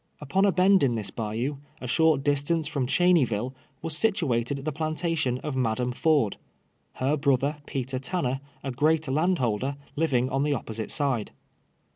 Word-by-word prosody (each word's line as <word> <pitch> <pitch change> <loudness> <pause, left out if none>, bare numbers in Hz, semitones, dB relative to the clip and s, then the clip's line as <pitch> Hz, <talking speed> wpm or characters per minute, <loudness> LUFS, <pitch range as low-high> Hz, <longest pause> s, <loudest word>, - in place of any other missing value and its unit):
Uj>on 170 +7 +1
a 200 - +4
bend 190 +2 +4
in 125 -4 +2
this 110 -3 -4
liayon, 115 +6 -3 0.2
a - - -7
short 155 +2 +3
distance 145 +3 +1
from 140 -5 -1
Cheney 175 +2 +4
ville. 120 +2 -2 0.3
was 165 - -2
situate<l 140 - 0
the 155 - -1
plantation 155 -3 -1
of 150 - -3
^ladam 125 -1 0
Ford 145 -7 +2 0.3
— - - -44 0.2
her 135 +4 0
brother, 140 0 +1
Peter 130 -1 -3
Tanner, 135 -3 -2 0.2
a 135 - -3
great 155 +4 +2
landholder, 135 - +1 0.2
living 135 -6 +1
on 135 +1 +1
the 145 0 +1
op])osite 110 -4 -4
side. 135 -7 0
140 Hz, 160 wpm, -27 LUFS, 125-160 Hz, 0.3 s, a